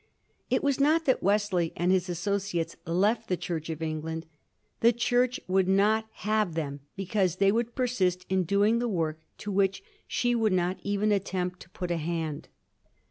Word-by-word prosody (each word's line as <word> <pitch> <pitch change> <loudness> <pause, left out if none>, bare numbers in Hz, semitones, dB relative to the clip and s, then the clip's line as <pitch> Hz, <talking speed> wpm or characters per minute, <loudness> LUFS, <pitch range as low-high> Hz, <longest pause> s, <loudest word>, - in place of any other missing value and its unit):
It - - +1
was 280 -1 +1
not 315 +3 +3
that 260 - +2
Wesley 200 -4 +1
and 175 +2 +2
his 185 -1 +1
asso 180 +4 0
ciates 175 -4 -3
left 200 +7 +1
the 180 - 0
Church 165 -2 -4
of 160 0 -4
England. 160 +1 -3 0.5
The 235 - +6
Church 245 +1 +1
would 185 0 +2
not 210 +3 +3 0.2
have 215 -5 +1
them 145 -3 -3 0.2
because 190 -2 0
they 195 +1 +4
would 235 +2 -1
persist 185 -8 0
in 190 0 +2
doing 205 +6 +3
the 240 0 0
work 160 -5 -1 0.2
to 205 - -5
which 195 0 +1 0.2
she 245 0 +1
would 225 -4 +2
not 180 0 0
even 205 +1 0
attempt 185 -2 -1
to 170 - -13
put 180 -1 -5
a 170 - +1
hand. 160 -2 -3
190 Hz, 180 wpm, -28 LUFS, 170-215 Hz, 0.5 s, The